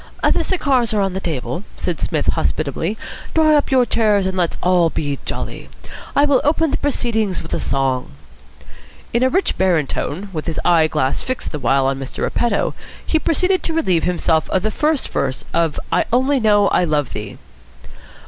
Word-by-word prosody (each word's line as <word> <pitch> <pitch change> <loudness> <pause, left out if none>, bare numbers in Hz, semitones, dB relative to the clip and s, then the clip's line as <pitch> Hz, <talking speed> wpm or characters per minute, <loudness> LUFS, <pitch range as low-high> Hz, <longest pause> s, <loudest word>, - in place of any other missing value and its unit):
"The - - +2
cigars 265 - +1
are - - +2
on 195 -1 0
the 190 - -2
table," 170 +1 -4
said 175 -5 -3
Psmith - - -1
hospitably. 155 - -2 0.4
"Draw 310 -1 +5
up 290 - +1
your 255 -2 +4
chairs, 210 -5 +2
and 190 0 -2
let's 175 -3 0
all 180 -2 +3
be 145 -3 -3
jolly. - - -5 0.5
I 285 - +5
will 285 -3 +3
open 315 +1 +2
the - - 0
proceedings 220 -8 0
with 165 - -8
a - - 0
song." 135 -2 -1 1.0
In 235 - +2
a 260 - +4
rich 380 +7 0
baritone, 180 +1 0
with 155 0 -4
his 165 - -2
eyeglass 155 -5 +2
fixed 255 0 -4
the 150 - -4
while 135 +1 +2
on 135 0 0
Mr. 135 -1 -5
Repetto, 240 - 0 0.3
he 315 - +1
proceeded 365 +4 +2
to 330 - -2
relieve 185 - +1
himself 165 -3 +1
of 190 - 0
the 215 - 0
first 300 +4 0
verse 135 -1 -2
of 165 -2 +1
"I - - +2
only 260 +3 +2
know 205 -3 +4
I - - +2
love 150 -5 0
thee." 105 -1 -6
190 Hz, 180 wpm, -19 LUFS, 155-255 Hz, 1.0 s, Draw